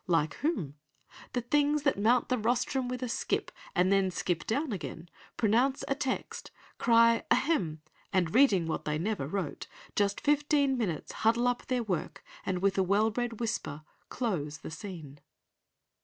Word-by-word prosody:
Like 165 -4 +2
whom? 180 - -2 0.6
The 245 - 0
things 290 +4 +2
that 280 - +3
mount 230 +4 +3
the 255 - +2
rostrum 250 +3 0
with 250 0 -4
a - - -1
skip, 230 - -1 0.2
And 180 +2 +3
then 195 -1 +3
skip 175 -1 -2
down 280 +5 0
again; 175 -3 -6 0.3
pronounce 245 +5 +2
a - - +2
text, 270 -2 -3 0.3
Cry, 230 0 +5
ahem! 200 - +1 0.3
and 180 -4 +1
reading 220 -10 +5
what 160 - -2
they 150 0 0
never 180 -4 -2
wrote, 180 -2 -4 0.3
Just 205 -1 +1
fifteen 295 -2 +2
minutes, 195 - -2
huddle 235 +2 +2
up 245 0 -1
their 250 -2 0
work, 185 -7 -3 0.2
And 185 -1 -1
with 195 0 +2
a - - +4
well 205 +4 +2
bred 240 -1 -3
whisper, 215 -10 -3 0.3
close 160 - -2
the - - -9
scene." 160 -5 -8
220 Hz, 160 wpm, -30 LUFS, 180-250 Hz, 0.6 s, Cry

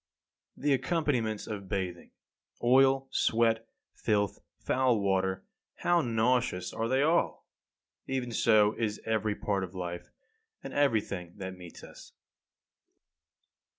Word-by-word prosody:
24. 145 - -5
The 145 - +5
accompaniments 130 - 0
of 100 -3 -6
bathing: 90 -3 -3 0.5
oil, 135 +2 +4
sweat, 115 0 +2 0.3
filth, 105 -4 0 0.2
foul 130 -3 +1
water 95 -1 0 0.3
how 175 -1 +2
nauseous 115 - 0
are 115 - -1
they 130 +3 +2
all! 165 +3 +1 0.6
Even 130 -2 -2
so 110 -2 +4
is 105 -2 -1
every 110 -2 0
part 100 -2 -1
of 95 0 -7
life, 90 -1 -5 0.5
and - - -7
everything 105 -10 0
that 95 -1 -6
meets 90 -2 -12
us. - - -13
110 Hz, 120 wpm, -30 LUFS, 95-130 Hz, 0.6 s, The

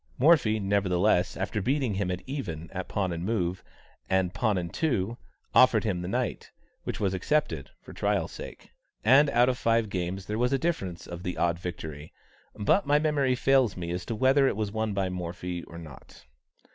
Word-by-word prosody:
Morphy, 130 -7 +4
nevertheless, 95 -2 +1
after 100 +3 -2
beating 130 0 0
him 95 -1 -1
at 90 0 -3
even, 85 - -5
at - - -5
pawn 95 -3 -1
and 85 0 -4
move, 90 -4 -1 0.5
and 95 -1 +1
pawn 105 -1 +1
and 85 -2 -4
two, 120 - 0 0.4
offered 125 -4 +6
him 95 -6 -1
the 90 - -4
knight, - - -2 0.4
which - - -4
was 95 -2 0
accepted 95 - 0
"for - - -11
trial's - - 0
sake;" - - -10 0.3
and 135 +6 +6
out 120 -1 +4
of 130 -1 0
five 115 -2 +2
games 90 +1 -3
there 105 +1 -3
was 125 +1 +2
a 135 - +3
difference 100 - -2
of 85 0 -7
the 90 -1 -4
odd 85 0 +1
victory, 80 -4 -7 0.4
but 125 - +2
my 145 +1 +5
memory 145 -4 +2
fails 130 -5 +3
me 85 -1 -4
as 90 +1 -3
to 115 - -4
whether 135 +4 +4
it - - 0
was 105 -1 -2
won 110 0 -1
by 95 -1 0
Morphy 90 0 -4
or 85 - -11
not. 80 -6 -12
100 Hz, 190 wpm, -28 LUFS, 90-125 Hz, 0.5 s, offered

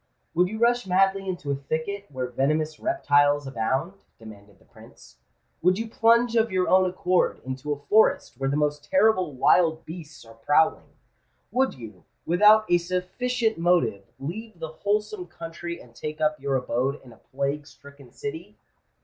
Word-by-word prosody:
"Would 180 +2 +3
you 220 +4 -6
rush 240 -1 +2
madly 195 +1 +2
into 170 -6 -4
a - - +1
thicket 160 +9 -4
where 130 -3 -4
venomous 150 +5 -1
reptiles 145 - +2
abound?" 135 - -2
demanded 100 -3 -14
the - - -26
Prince: 65 0 -18 0.4
"would 185 +2 +3
you 225 +1 -3
plunge 230 +1 +3
of 225 -1 +2
your 185 -1 +1
own 185 0 +4
accord 180 0 0
into 130 +3 -5
a 145 - -1
forest 175 - +2
where 135 0 0
the 140 - 0
most 150 -1 0
terrible 190 -6 +2
wild 160 +4 +3
beasts 160 -5 -10
are 115 - -14
prowling? 145 +8 +1 0.6
would 265 +1 +1
you, 110 -8 -11 0.2
without 210 +5 +5
a 175 - +4
sufficient 220 +6 -2
motive, 145 - +2
leave 210 +9 -7
the 160 -1 -6
wholesome 205 +2 -2
country 170 0 -7
and 120 - -16
take 150 +5 -6
up 155 0 +1
your 140 0 -1
abode 130 +2 -1
in 125 -3 -14
a - - -19
plague 140 +2 -4
stricken 140 -3 -16
city? 165 - -7
160 Hz, 165 wpm, -25 LUFS, 140-195 Hz, 0.6 s, without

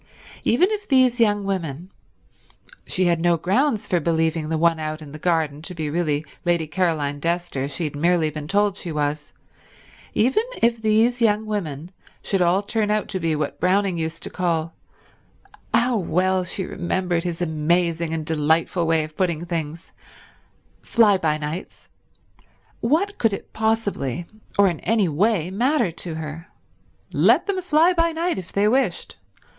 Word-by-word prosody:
Even 360 - +3
if 415 -1 -3
these 255 -3 +3
young 205 -3 +3
women—she 185 - -6
had 170 -1 +2
no 170 0 +3
grounds 220 - +1
for 180 - +1
believing 160 -1 0
the 160 - 0
one 165 0 +2
out 155 0 -4
in 150 -3 -11
the 155 - -9
garden 155 -4 0
to 180 +3 -8
be 155 -3 -3
really 155 -2 0 0.2
Lady 170 -2 +1
Caroline 155 -4 -1
Dester, 170 -5 -1
she 145 +4 -4
had 150 -2 -3
merely 165 0 +2
been 150 -1 -6
told 205 +2 +1
she 170 - -5
was—even 150 - -3 0.2
if 230 -1 +2
these 225 +3 +2
young 215 -1 +3
women 175 -6 -4 0.3
should 195 -2 0
all 180 +3 +3
turn 210 0 -1
out 210 -1 0
to 190 - -2
be 165 -2 0
what 150 -1 -3
Browning 190 +1 +2
used 160 0 -4
to - - -4
call—how 180 +7 -3
well 185 +1 +1
she 185 +1 -3
remembered 175 -1 -1
his 175 -2 -3
amusing 170 0 0
and 160 -1 -3
delightful 160 +2 +1
way 165 -1 +2
of 155 0 -9
putting 170 -3 -1
things—Fly 170 +5 -2
by 155 -3 +1
Nights, 155 +4 -6 0.9
what 340 - 0
could 225 -3 +2
it - - -7
possibly, 210 - -1 0.3
or 200 0 +6
in 170 -4 -1
any 220 -4 +1
way 180 +2 +1
matter 240 - +1
to 165 0 -6
her? 160 +1 -7 0.7
Let - - +4
them 390 -2 -1
fly 340 0 +4
by 335 -1 +1
night 335 - -1
if 185 - -10
they 200 +1 +2
wished. 235 -5 0
175 Hz, 155 wpm, -22 LUFS, 160-210 Hz, 0.9 s, or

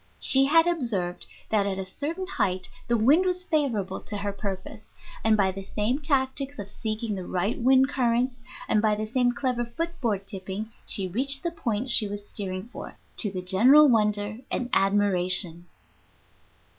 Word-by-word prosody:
She 270 0 +7
had 325 +4 +4
observed 230 - -2 0.2
that 205 -2 +1
at 195 -1 -2
a 190 - -4
certain 315 - -5
height 185 - -1 0.2
the 235 - +1
wind 280 +11 +4
was 365 -1 -2
favorable 240 - -2
to 205 - -7
her 200 0 -4
purpose, 200 +2 -7 0.3
and 220 -1 +3
by 195 -2 +2
the 195 +1 -8
same 215 +7 -2
tactics 275 -1 -1
of 200 -1 -7
seeking 220 0 -4
the 185 -2 -6
right 185 +5 -2
wind 265 +2 +4
currents 245 -1 0 0.3
and 215 - +2
by 215 -1 +2
the 215 +1 -4
same 245 +2 +1
clever 250 -2 -2
foot 330 +9 -6
board 205 -5 -2
tipping 195 +3 -6 0.2
she 195 -2 0
reached 270 +8 0
the 340 - -2
point 240 -5 -3
she 215 - +7
was 205 0 -8
steering 185 -2 -5
for, - - -10 0.2
to 210 - +5
the 185 -1 -5
general 250 +12 +6
wonder 210 -2 0
and 245 -1 -3
admiration. 185 -3 +2
215 Hz, 170 wpm, -25 LUFS, 195-265 Hz, 0.3 s, She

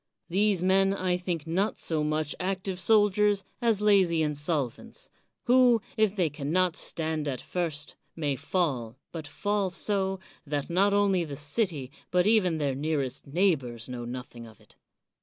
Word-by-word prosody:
These 195 0 +2
men 195 +1 +3
I 185 -2 0
think 180 -3 -3
not 185 +6 0
so 155 -2 0
much 155 0 0
active 185 0 -3
soldiers 205 0 +3 0.2
as 225 -4 +2
lazy 190 -6 +4
insolvents; 145 -4 -3 0.3
who, 245 -1 +5 0.2
if 215 -3 +2
they 180 -5 +2
can 145 -1 -5
not 180 -1 +2
stand 160 -2 -1
at 130 -3 -2
first, 160 -5 -4 0.2
may 145 -4 -1
fall, 135 -6 -2
but 160 -3 -6
fall 205 +5 -1
so, 190 +1 0 0.2
that 145 0 -3
not 195 +4 +3
only 195 -3 +3
the 145 -4 -6
city 150 - -1 0.2
but 180 0 +2
even 200 -6 +3
their 145 -3 0
nearest 140 -2 -2
neighbors 140 - 0
know 125 -2 -6
nothing 120 -1 -7
of 110 -2 -16
it. - - -22
170 Hz, 155 wpm, -28 LUFS, 145-195 Hz, 0.3 s, who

